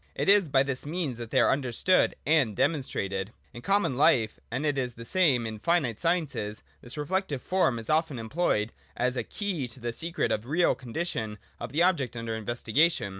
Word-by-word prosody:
It -, -, -2 dB
is 200 Hz, -5 st, +5 dB
by 135 Hz, -1 st, +4 dB
this 135 Hz, -2 st, -3 dB
means 150 Hz, -6 st, -3 dB
that 115 Hz, -2 st, -6 dB
they 130 Hz, -, +2 dB
are -, -, +4 dB
understood 135 Hz, +7 st, +2 dB
and 140 Hz, -9 st, +3 dB
demonstrated. 110 Hz, -, -1 dB, 0.2 s
In 120 Hz, -, -9 dB
common 195 Hz, -5 st, +1 dB
life, 115 Hz, -6 st, +3 dB
and 145 Hz, -, -2 dB
it 145 Hz, -2 st, +1 dB
is 125 Hz, -3 st, -2 dB
the 115 Hz, -, -9 dB
same 140 Hz, -8 st, +3 dB
in 110 Hz, -, -3 dB
the 110 Hz, -, -9 dB
finite 135 Hz, -6 st, +1 dB
sciences, 155 Hz, -12 st, -1 dB, 0.2 s
this 120 Hz, +4 st, -7 dB
reflective 150 Hz, -2 st, -2 dB
form 180 Hz, -10 st, +2 dB
is 115 Hz, -1 st, -6 dB
often 155 Hz, -3 st, +1 dB
employed 115 Hz, -2 st, 0 dB, 0.3 s
as 125 Hz, +1 st, 0 dB
a -, -, -1 dB
key 190 Hz, -11 st, -3 dB
to 125 Hz, +2 st, -10 dB
the 120 Hz, -1 st, -3 dB
secret 170 Hz, +7 st, -1 dB
of 105 Hz, -, 0 dB
the 115 Hz, -, -16 dB
real 170 Hz, +5 st, +3 dB
condition 120 Hz, -4 st, -4 dB, 0.2 s
of 120 Hz, 0 st, -6 dB
the 160 Hz, +5 st, +2 dB
objects 140 Hz, -10 st, +1 dB
under 115 Hz, -1 st, -3 dB
investigation. 120 Hz, +4 st, +1 dB
130 Hz, 200 wpm, -28 LUFS, 115-165 Hz, 0.3 s, is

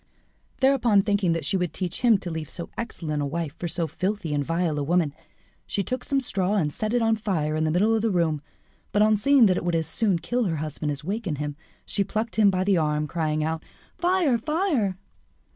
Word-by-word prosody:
Thereupon, 245 Hz, -7 st, +4 dB
thinking 195 Hz, -5 st, +1 dB
she 190 Hz, -, +2 dB
would 180 Hz, -2 st, -2 dB
teach 180 Hz, -2 st, -3 dB
him 235 Hz, -4 st, +5 dB
to 175 Hz, -, -4 dB
leave 160 Hz, -2 st, -5 dB
so 170 Hz, -, -6 dB
excellent 160 Hz, -10 st, -3 dB
a -, -, 0 dB
wife 160 Hz, 0 st, -4 dB
for 175 Hz, -, -2 dB
so 170 Hz, +1 st, -1 dB
filthy 185 Hz, -1 st, -2 dB
and 145 Hz, -1 st, 0 dB
vile 165 Hz, 0 st, -1 dB
a -, -, -1 dB
woman, 165 Hz, -1 st, +1 dB, 0.5 s
she 200 Hz, -, -1 dB
took 255 Hz, +4 st, -3 dB
some 275 Hz, -1 st, +1 dB
straw 200 Hz, -6 st, +1 dB
and 150 Hz, -7 st, 0 dB
set 215 Hz, +2 st, -1 dB
it 240 Hz, -, +2 dB
on 225 Hz, 0 st, +3 dB
fire 170 Hz, -8 st, -1 dB
in 155 Hz, 0 st, +1 dB
the -, -, +1 dB
middle 205 Hz, +7 st, +3 dB
of 220 Hz, -, +2 dB
the 225 Hz, -, +1 dB
room; 165 Hz, -6 st, +1 dB, 0.5 s
but 210 Hz, -, +4 dB
on 215 Hz, 0 st, +4 dB
seeing 265 Hz, +4 st, +5 dB
that 185 Hz, -3 st, +3 dB
it -, -, -2 dB
would 175 Hz, -1 st, 0 dB
as 160 Hz, -1 st, +1 dB
soon 195 Hz, +3 st, +1 dB
kill 240 Hz, +7 st, -1 dB
her 170 Hz, -4 st, 0 dB
husband 150 Hz, 0 st, -3 dB
as 140 Hz, 0 st, -3 dB
awaken 195 Hz, -2 st, -2 dB
him, 145 Hz, 0 st, -4 dB, 0.3 s
she 200 Hz, -, +1 dB
plucked 220 Hz, +4 st, -3 dB
him 210 Hz, -2 st, +6 dB
by 185 Hz, -1 st, +1 dB
the 195 Hz, -1 st, +3 dB
arm, 150 Hz, -1 st, +1 dB
crying 155 Hz, -1 st, -1 dB
out 160 Hz, +1 st, -2 dB, 0.4 s
"Fire! 345 Hz, -9 st, +2 dB
fire!" 285 Hz, -, 0 dB
185 Hz, 225 wpm, -25 LUFS, 160-220 Hz, 0.5 s, him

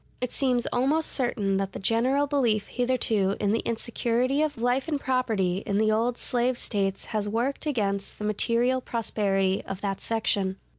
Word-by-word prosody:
It 250 Hz, -1 st, -3 dB
seems 250 Hz, -3 st, +1 dB
almost 285 Hz, +6 st, +2 dB
certain 210 Hz, -7 st, 0 dB
that 195 Hz, 0 st, -2 dB
the -, -, -5 dB
general 245 Hz, +8 st, +2 dB
belief 245 Hz, -8 st, +1 dB
hitherto 225 Hz, -6 st, +1 dB
in 205 Hz, -1 st, +1 dB
the 225 Hz, -, +2 dB
insecurity 235 Hz, +4 st, 0 dB
of 300 Hz, -4 st, -1 dB
life 245 Hz, +4 st, +1 dB
and 300 Hz, -3 st, -1 dB
property 225 Hz, -9 st, 0 dB
in 200 Hz, -, +1 dB
the 215 Hz, 0 st, +3 dB
old 235 Hz, +3 st, +1 dB
slave 245 Hz, 0 st, 0 dB
States 195 Hz, -4 st, -2 dB
has 210 Hz, -1 st, 0 dB
worked 245 Hz, +8 st, -1 dB
against 200 Hz, -8 st, -1 dB
the 210 Hz, -, -4 dB
material 235 Hz, +4 st, +1 dB
prosperity 195 Hz, -5 st, 0 dB
of 195 Hz, 0 st, -6 dB
that 195 Hz, -1 st, -2 dB
section. 200 Hz, -4 st, 0 dB
230 Hz, 165 wpm, -26 LUFS, 200-255 Hz, -, the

